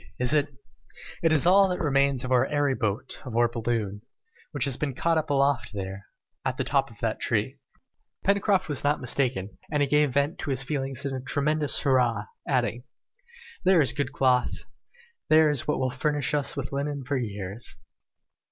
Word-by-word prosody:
is 125 +3 +1
it 150 -1 +3 0.4
?" - - -15
"It 165 - +3
is 155 0 +3
all 195 +2 +6
that 180 - -1
remains 140 -3 +1
of 130 - -4
our 130 +1 +4
airy 145 -2 +1
boat, 110 +1 -3
of 120 -3 -5
our 120 0 +5
balloon, 115 -3 -2 0.5
which 145 -4 +1
has 135 -3 +1
been 140 -1 -3
caught 165 +3 +2
up 155 - -5
aloft 140 -5 +1
there, 95 0 -6 0.4
at - - -2
the - - 0
top - - +1
of - - -16
that - - -1
tree!" - - -1 0.7
Pencroft 200 -1 +2
was 145 -4 -2
not 145 +1 +2
mistaken, 120 -7 -1
and 150 -1 +2
he - - +1
gave 150 -2 +2
vent 140 +3 +1
to - - -4
his 135 -1 +2
feelings 135 -1 -2
in 135 - -2
a 130 - -4
tremendous 150 +3 +1
hurrah, 125 -6 +2 0.2
adding, 125 -3 0 0.8
"There 185 -1 +5
is 135 -6 +3
good 140 - -2
cloth! 125 -2 +1 0.7
There 155 -1 +6
is 140 -4 -2
what - - +1
will 130 -1 0
furnish 150 0 -1
us 145 -1 -1
with 140 -1 -4
linen 140 0 -3
for 140 +2 -1
years. 105 -2 -5
140 Hz, 190 wpm, -26 LUFS, 125-150 Hz, 0.8 s, all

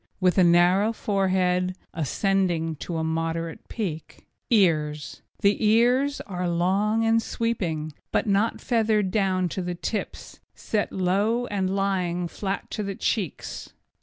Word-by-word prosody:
With 185 0 +3
a - - +7
narrow 180 +5 +4
forehead, 185 -3 +1 0.2
ascending 170 0 0
to 170 +3 -4
a 160 - -1
moderate 165 +1 -3
peak. 170 -9 -5 0.2
EARS 155 -9 +1 0.2
The 200 +2 +3
ears 245 +6 +3
are 180 -2 -3
long 200 +6 +1
and 225 0 +3
sweeping, 170 -11 -2 0.2
but - - +1
not 205 +2 +1
feathered 215 -5 +1
down 190 -3 +1
to 185 - -3
the 175 0 -3
tips, 210 +5 -5 0.2
set 210 -2 -2
low 200 +6 +1
and 195 -3 -1
lying 180 -3 0
flat 195 +3 -4
to 215 - -3
the 200 -1 -3
cheeks. 190 -6 -3
190 Hz, 135 wpm, -25 LUFS, 175-210 Hz, 0.2 s, a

